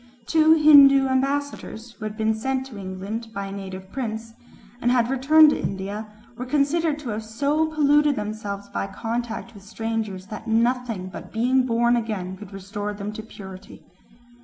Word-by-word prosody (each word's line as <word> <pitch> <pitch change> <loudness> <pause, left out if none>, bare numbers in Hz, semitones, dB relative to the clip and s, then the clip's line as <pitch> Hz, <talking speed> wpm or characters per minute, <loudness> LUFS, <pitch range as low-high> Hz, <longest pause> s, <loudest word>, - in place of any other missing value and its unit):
Two 320 +2 +5
Hindoo 280 -3 +7
ambassadors, 265 -3 -2
who 225 - -9
had 215 0 -5
been 220 0 +1
sent 260 +4 -2
to 250 -6 -10
England 195 +4 -5
by 200 0 -3
a 195 - -7
native 190 -1 -8
prince 225 -3 -4 0.5
and 240 - +2
had 245 0 +2
returned 300 +4 +6
to - - -2
India, 200 +3 -4 0.3
were 250 - -3
considered 300 +3 +1
to 295 -5 -7
have 215 0 -3
so 285 +8 0
polluted 295 -1 +3
themselves 210 -2 -5
by - - -3
contact 230 +3 -4
with 200 - -13
strangers 220 -2 -4
that 215 +2 -8
nothing 230 -4 0
but - - -10
being 250 +3 +2
born 235 0 +3
again 210 -6 -3
could 200 0 -11
restore 205 +2 -5
them 205 +1 -5
to 220 - -6
purity. 190 -3 -11
225 Hz, 165 wpm, -24 LUFS, 205-265 Hz, 0.5 s, Hindoo